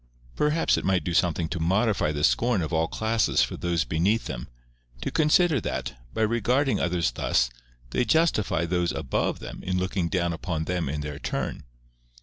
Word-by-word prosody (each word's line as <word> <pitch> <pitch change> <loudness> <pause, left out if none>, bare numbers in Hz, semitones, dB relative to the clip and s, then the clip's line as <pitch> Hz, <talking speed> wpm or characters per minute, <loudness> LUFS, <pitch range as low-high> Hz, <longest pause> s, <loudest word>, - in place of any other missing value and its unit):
Perhaps 150 +2 +2
it - - -8
might 95 -3 +1
do 85 - -2
something 85 -1 +2
to 85 - -3
modify 95 0 +1
the 75 0 -3
scorn 115 +1 +2
of 80 - -4
all 80 0 +2
classes 110 +4 +1
for - - -3
those 85 -2 0
beneath 90 - +1
them, 60 -3 -5 0.5
to - - -2
consider 155 -2 +3
that, - - -3 0.2
by 110 - 0
regarding 120 +5 +1
others 85 -6 +1
thus, - - +1 0.4
they - - +1
justify 120 - +2
those 90 0 0
above - - -1
them - - -8
in 90 0 -2
looking 90 -1 -1
down 85 -1 0
upon 80 -1 -3
them 90 -3 -2
in 75 +1 -3
their 75 -1 -5
turn. - - -3
90 Hz, 175 wpm, -26 LUFS, 80-110 Hz, 0.5 s, consider